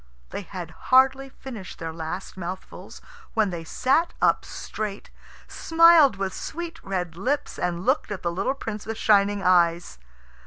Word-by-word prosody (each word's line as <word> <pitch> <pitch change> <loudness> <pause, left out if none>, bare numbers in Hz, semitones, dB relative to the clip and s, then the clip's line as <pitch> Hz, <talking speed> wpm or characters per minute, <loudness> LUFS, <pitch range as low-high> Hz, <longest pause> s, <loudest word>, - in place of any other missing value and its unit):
They - - -4
had 180 -3 -8 0.2
hardly 265 +1 +5
finished 235 -8 -9
their 165 -1 -5
last 165 +3 -6
mouthfuls 185 0 -8 0.3
when 215 -4 +2
they 170 -2 -5
sat 275 - +1
up - - +3
straight, 210 -2 -6 0.4
smiled 330 -6 +5
with 195 -1 -3
sweet 335 +1 -6
red 180 -4 -3
lips, 260 +11 -2
and 175 0 -2
looked 260 0 +1
at 205 -2 -5
the 170 - 0
little 195 +10 -1
Prince 215 -6 -6
with 225 0 -4
shining 205 -2 +3
eyes. 170 - +2
200 Hz, 150 wpm, -25 LUFS, 180-265 Hz, 0.4 s, hardly